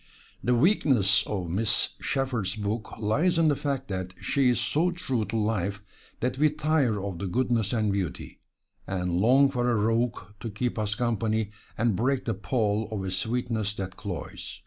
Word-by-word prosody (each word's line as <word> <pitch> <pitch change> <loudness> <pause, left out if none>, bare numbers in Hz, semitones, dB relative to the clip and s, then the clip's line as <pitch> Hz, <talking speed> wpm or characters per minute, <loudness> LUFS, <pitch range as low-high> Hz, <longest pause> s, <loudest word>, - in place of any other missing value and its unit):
The 125 +4 +3
weakness 120 - +4
of 90 -5 -3
Miss 105 +3 +1
Sheppard's 120 -8 -1
book 105 +1 -3
lies 150 - +2
in 165 -2 +4
the 145 - +3
fact 135 -2 -2
that 95 -1 -4
she 135 -3 +2
is 125 - +2
so 165 +4 +2
true 135 -11 -1
to 115 - -5
life 100 -2 -1 0.4
that 125 +2 -1
we 155 +1 +5
tire 150 -7 +1
of 95 -3 -4
the 100 - -2
goodness 115 0 +1
and 110 -3 +1
beauty, 95 -5 -4 0.5
and 90 -2 -1
long 130 +9 +5
for 125 -2 0
a 120 - +3
rogue 115 +3 +1 0.2
to 115 - -5
keep 115 +3 -2
us 105 -1 0
company 110 -2 0 0.3
and 115 -2 +2
break 130 +6 0
the 115 - 0
pall 105 0 0
of 105 -3 -3
a 95 - -3
sweetness 110 0 -1
that 95 -2 -5
cloys. 95 -5 -6
110 Hz, 175 wpm, -27 LUFS, 100-125 Hz, 0.5 s, we